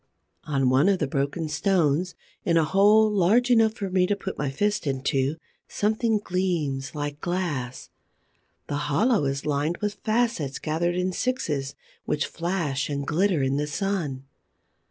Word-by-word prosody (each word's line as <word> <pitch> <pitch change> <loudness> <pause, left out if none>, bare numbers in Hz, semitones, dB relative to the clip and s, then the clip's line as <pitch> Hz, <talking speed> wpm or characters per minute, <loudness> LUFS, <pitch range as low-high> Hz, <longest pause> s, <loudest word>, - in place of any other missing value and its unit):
On 135 -4 +1
one 140 +9 +4
of 195 - +3
the 155 - 0
broken 140 +4 -2
stones, 165 +1 +1 0.3
in 170 -1 +2
a 165 - +4
hole 205 +6 +5
large 210 +5 +3
enough 225 -2 +4
for 195 -4 -4
me 185 -1 +3
to 205 - +1
put 195 -1 -6
my 145 - -2
fist 205 +5 -1
into, 135 +1 0 0.3
something 220 +1 +1
gleams 170 -9 -2
like 145 0 -4
glass. 160 -9 -3 0.7
The 145 - -3
hollow 215 - +2
is 135 0 -2
lined 150 +3 0
with 210 0 -3
facets 220 - 0
gathered 170 +3 -1
in 180 +1 0
sixes 150 - -2 0.3
which 150 - 0
flash 165 -6 -2
and 140 -1 -2
glitter 175 0 +1
in 135 +1 +1
the 150 0 -1
sun. 155 -6 -2
170 Hz, 155 wpm, -25 LUFS, 140-200 Hz, 0.7 s, hole